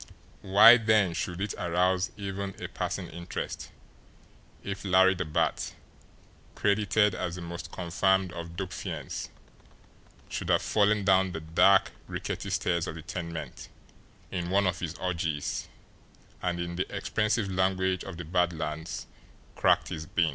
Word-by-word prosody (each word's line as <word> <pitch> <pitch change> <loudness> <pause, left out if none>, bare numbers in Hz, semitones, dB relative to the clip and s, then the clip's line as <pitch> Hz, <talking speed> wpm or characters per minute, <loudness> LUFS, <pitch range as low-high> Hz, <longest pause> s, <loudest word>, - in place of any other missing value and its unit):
Why 105 +5 +8
then 110 -6 +3
should 85 +1 -3
it 105 0 -1
arouse 90 +3 +1
even 100 -1 -4
a - - -4
passing - - -3
interest 85 +1 -5 0.9
if 100 0 -5
Larry 95 0 +5
the 95 - -3
Bat, 80 +1 -1 0.8
credited 105 0 +2
as 90 -1 -3
the 90 - -7
most 85 +1 -7
confirmed 95 +1 +1
of 85 0 -7
dope 95 0 -4
fiends, - - -5 1.0
should - - -4
have - - +3
fallen 105 -1 +2
down 95 -1 +4
the 80 - -3
dark, 85 +5 +4 0.2
rickety - - -4
stairs 85 0 0
of - - -5
the 80 - -8
tenement 85 -3 -6 0.6
in 90 -2 -3
one 100 +2 +3
of 90 -1 0
his 85 -1 -4
orgies, 85 -5 -2 0.7
and, 90 -1 -1
in 85 0 -4
the 90 - -2
expressive 105 -2 0
language 95 -1 +1
of 95 -3 -8
the 85 - -6
Bad 90 +1 +1
Lands, 80 0 -4 0.5
cracked - - +3
his 80 0 -5
bean! 85 -1 +2
90 Hz, 145 wpm, -28 LUFS, 85-100 Hz, 1.0 s, Why